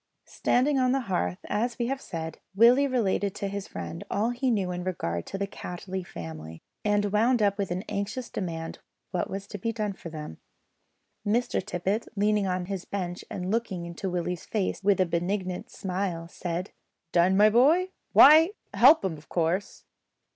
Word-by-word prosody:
Standing 270 +3 +1
on 255 0 +3
the 270 - +1
hearth, 90 - -1
as 230 +3 -1
we 240 - 0
have 270 +2 -2
said, 160 -2 -6 0.2
Willie 245 +6 +6
related 205 -6 0
to 200 - -3
his 200 0 -5
friend 85 -1 -6
all 220 +4 +1
he 250 +2 0
knew 195 -6 +1
in 180 0 -4
regard 85 - -3
to 195 - -4
the 200 - -1
Cattley 190 0 -6
family, 80 - -8 0.2
and 205 -1 +1
wound 230 +4 +3
up 205 -1 +2
with 195 - -1
an 180 +2 -2
anxious 210 +4 -3
demand 165 -4 -5 0.3
what 180 - -1
was 195 +1 -5
to 205 - -8
be 230 +5 -1
done 210 -2 -2
for 175 - -9
them. 150 - -8 0.8
Mr 230 0 0
Tippet, 195 +7 -2
leaning 210 -1 +2
on 180 -1 -1
his 190 -1 -4
bench 180 -2 -4
and 185 0 -3
looking 205 -6 -1
into 170 +3 -4
Willie's 180 -1 -3
face 200 -4 -1
with 200 -1 +3
a 185 - +4
benignant 180 +2 -2
smile, 180 -3 -3
said 175 +2 -4 0.4
"Done, 180 +2 +4
my 210 +1 +6
boy? 310 - +4 0.2
why, 320 +6 +8 0.2
help 275 +1 +7
'em 160 -5 -2
of 155 - -21
course." 175 +3 -1
195 Hz, 175 wpm, -27 LUFS, 175-225 Hz, 0.8 s, why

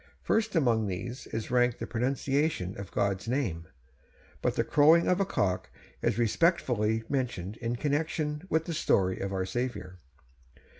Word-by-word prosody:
First 220 -2 +1
among 115 -8 +2
these 110 +7 -5
is 110 +1 -5
ranked 125 -1 +3
the - - -4
pronunciation 135 - -1
of 100 -2 -7
God's 100 +1 -1
name; 115 - -1 0.7
but - - 0
the - - +2
crowing 160 +3 +5
of 180 +1 +3
a 195 - +2
cock 95 - -1 0.3
is - - +1
respectfully 115 - +2
mentioned, 115 -8 -2
in 120 0 -2
connection 150 +2 -1
with 160 0 +1
the 170 - -3
story 95 - +1
of 100 - -3
our 95 -1 -1
Saviour. 95 -4 -4
120 Hz, 150 wpm, -29 LUFS, 100-150 Hz, 0.7 s, crowing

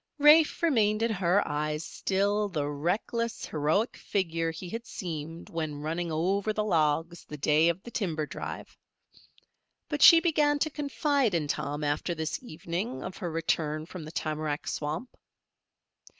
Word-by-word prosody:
Rafe 300 +3 +6
remained 220 -8 +3
in 230 - +1
her 190 0 +2
eyes 150 +1 -2
still 205 +2 0
the 150 -6 -2
reckless, 200 +10 -2
heroic 160 +10 0
figure 165 -4 -1
he 165 +3 -7
had 230 +5 -6
seemed 165 -2 -6
when 155 -3 -3
running 165 +2 -2
over 190 +7 0
the 215 - 0
logs 165 -2 +1
the 150 - -8
day 155 +3 +4
of 170 +3 -2
the 240 - -9
timber 165 -9 -1
drive. - - -7 1.1
But 295 -1 -2
she 335 - +10
began 300 -3 +2
to 310 +2 0
confide 285 - 0
in 155 -3 0
Tom 145 +1 -2
after 150 +4 -1
this 160 - -3
evening 180 +2 -4
of 185 - -6
her 180 -4 -3
return 155 -1 -1
from 175 0 -8
the 155 - -8
tamarack 155 -2 -3
swamp. 155 +12 -4
170 Hz, 150 wpm, -29 LUFS, 155-220 Hz, 1.1 s, she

